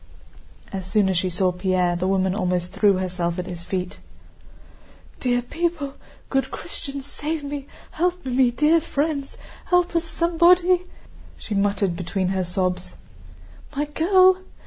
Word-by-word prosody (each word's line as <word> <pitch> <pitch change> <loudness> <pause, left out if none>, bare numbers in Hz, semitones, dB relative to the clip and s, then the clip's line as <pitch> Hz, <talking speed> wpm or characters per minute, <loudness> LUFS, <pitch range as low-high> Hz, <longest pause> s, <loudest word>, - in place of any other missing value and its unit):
As 190 -1 -4
soon 205 -1 +2
as 185 - +1
she 185 - -1
saw 180 +1 +1
Pierre, 180 -1 +1
the 180 +2 -1
woman 190 -1 +1
almost 180 -3 -1
threw 205 -2 +4
herself 180 -2 -2
at 180 - -3
his 175 -2 -7
feet. 180 0 -4 1.2
"Dear 245 -1 +1
people, 320 0 -2 0.3
good 270 -1 0
Christians, 275 -1 -6
save 300 +2 -4
me, 285 -1 -5 0.2
help 360 0 -1
me, 255 -1 +3
dear 300 +7 +3
friends... 290 -2 -2 0.3
help 355 -1 +2
us, 335 - +2
somebody," 345 +2 +3 0.5
she 215 - -6
muttered 200 -2 +1
between 185 +1 -2
her 190 -1 0
sobs. 180 0 -2 0.8
"My 290 +2 0
girl... 370 +5 +4
240 Hz, 140 wpm, -23 LUFS, -, 1.2 s, threw